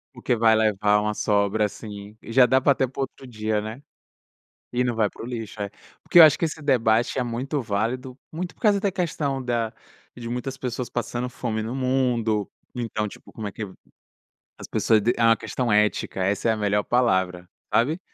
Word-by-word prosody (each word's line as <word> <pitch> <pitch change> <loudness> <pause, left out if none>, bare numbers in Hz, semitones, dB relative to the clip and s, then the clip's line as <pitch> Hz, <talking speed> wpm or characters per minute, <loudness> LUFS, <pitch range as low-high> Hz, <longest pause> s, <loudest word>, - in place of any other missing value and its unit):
Porque 120 - 0
vai 110 0 +5
levar 105 -1 +3
uma 105 0 -1
sobra 105 0 +1
assim, 105 0 -7
e 115 - -9
já 130 +1 +7
dá 130 +1 +4
até 135 -1 +3
para 130 +2 -8
outro 135 0 -5
dia, 110 -2 -1
né. 110 +6 -7 0.9
E 125 +1 +1
não 120 -2 -1
vai 110 -2 +2
para - - -12
o - - -5
lixo. 115 -4 -6
É. 100 - -2 0.3
Porque - - +1
eu - - +13
acho 155 -3 +6
que 165 - +2
esse 160 0 -4
debate 120 -3 +2
é - - +1
muito 130 +5 -2
válido, 120 +4 -2
muito 175 +3 -5
por - - -31
causa 205 -3 +4
da 200 -1 0
questão 145 -7 -2
da 115 -2 -1 0.4
de 120 -1 -7
muitas 125 +2 -4
pessoas 125 -1 -4
passando 120 +1 -3
fome 110 -3 -3
no 115 +4 -4
mundo, 125 -5 0 0.3
então, 110 -3 -2
tipo, - - -13
como 110 -2 -5
é - - -5
que 110 - -6 1.0
as - - -8
pessoas 110 -2 +2
d 120 - +3
é - - 0
uma 115 0 +6
questão 125 -3 -3
ética, 105 -2 +1
essa 100 +3 0
é - - +4
a - - -1
melhor 105 0 +1
palavra, 95 -8 +1 0.3
sabe. 150 +9 +2
115 Hz, 200 wpm, -24 LUFS, 105-130 Hz, 1.0 s, eu